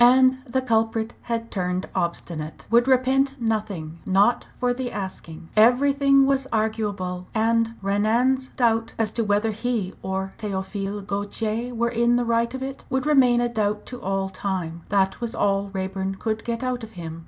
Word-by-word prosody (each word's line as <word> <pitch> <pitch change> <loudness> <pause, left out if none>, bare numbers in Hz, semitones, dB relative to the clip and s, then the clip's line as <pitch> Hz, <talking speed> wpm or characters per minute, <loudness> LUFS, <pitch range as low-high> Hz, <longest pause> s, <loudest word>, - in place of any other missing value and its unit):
And 260 +1 +6
the 260 +2 0
culprit 225 -1 +1 0.2
had 230 0 -2
turned 180 -1 -2
obstinate 170 -2 -3
would 240 +2 +5
repent 265 +1 +3
nothing 210 -8 -2
not 200 +5 +3
for 245 0 +1
the 245 -1 -4
asking. 180 -5 -7
Everything 275 +4 +5
was 270 -1 +1
arguable, 205 -5 -1
and 230 +1 +2
Renan's 230 +7 +2
doubt 225 -3 +1
as 220 -2 0
to 230 - -1
whether 210 +1 +1
he 220 -3 -2
or 190 0 -3
Théophile 200 0 -4
Gautier 215 +4 -2
were 235 +1 +1
in 235 0 +2
the 245 0 +1
right 230 0 +1
of 260 - -4
it, 270 0 -6
would 265 0 0
remain 255 -5 +5
a 240 - +2
doubt 210 -3 -1
to 250 -1 -7
all 195 -1 -1
time 185 -3 -4
that 195 +2 +1
was 235 -1 -3
all 200 0 +1
Raeburn 190 0 -3
could 220 +2 -3
get 235 0 -3
out 250 -2 -2
of 225 0 -9
him. 165 -2 -7
225 Hz, 165 wpm, -24 LUFS, 195-245 Hz, 0.2 s, And